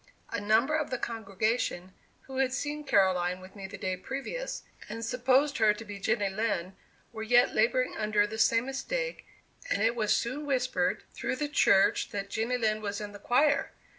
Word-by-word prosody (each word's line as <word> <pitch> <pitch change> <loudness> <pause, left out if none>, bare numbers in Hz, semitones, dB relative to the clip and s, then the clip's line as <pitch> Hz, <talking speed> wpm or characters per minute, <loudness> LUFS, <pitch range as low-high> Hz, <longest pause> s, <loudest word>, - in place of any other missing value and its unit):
A 230 - -2
number 225 +8 +3
of 310 -2 -1
the 255 - -2
congregation, 215 -4 -2 0.3
who 265 -1 -9
had 265 -1 +1
seen 295 +2 -3
Caroline 185 -7 +2
with 185 +2 -13
me 195 -1 -7
the - - -9
day 185 0 -2
previous, 275 - -5 0.3
and 230 0 -4
supposed 255 +4 +2
her 215 -1 +5
to 225 - -9
be 205 -1 -7
Jenny 210 0 +1
Lind, 195 -3 -2 0.4
were 220 - -6
yet 240 +2 +4
laboring 250 +3 +2
under 210 -1 +2
the 220 +1 -6
same 230 +1 +4
mistake, - - -3 0.4
and 200 - +1
it 230 +2 +2
was 215 -3 +2
soon 275 +6 -3
whispered 255 -2 0
through - - -2
the 295 +3 -2
church 200 -9 +3
that 200 -1 -5
Jenny 230 +3 0
Lind 215 -2 0
was 200 -1 -3
in 210 -1 -6
the 205 - -11
choir! 285 +7 +2
225 Hz, 185 wpm, -29 LUFS, 205-265 Hz, 0.4 s, her